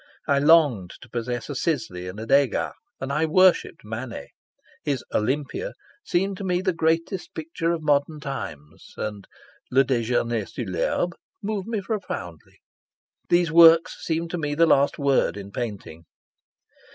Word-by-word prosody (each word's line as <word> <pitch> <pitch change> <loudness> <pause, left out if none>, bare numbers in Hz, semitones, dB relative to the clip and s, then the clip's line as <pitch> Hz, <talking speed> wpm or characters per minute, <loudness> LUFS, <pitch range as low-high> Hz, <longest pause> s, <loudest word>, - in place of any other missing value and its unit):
I 140 -2 +3
longed 145 - +4
to 120 - -13
possess 120 0 -3
a 145 - -4
Sisley 115 - -2
and 95 +3 -7
a 110 - -5
Degas, 135 +1 +2 0.3
and 135 +1 -3
I 160 +2 +1
worshipped 180 -4 +3
Manet. 115 +3 -6 0.5
His 140 -4 -1 1.0
seemed 190 +2 0
to 200 - -6
me 180 -1 0
the 185 -2 +1
greatest 165 +3 -1
picture 165 +1 -2
of 165 -2 -2
modern 150 +1 +1
times, 75 - -7
and 105 -2 -5 0.4
moved 120 -4 +1 1.2
me 225 -3 -2
profoundly. 140 - -6 0.7
These 175 -1 +3
works 165 0 +6
seemed 165 0 -2
to 175 - -2
me 145 -2 -2
the 165 +2 +5
last 140 -3 +3
word 140 -6 +2
in 100 0 -8
painting. 100 -9 -6
140 Hz, 130 wpm, -24 LUFS, 115-165 Hz, 1.2 s, works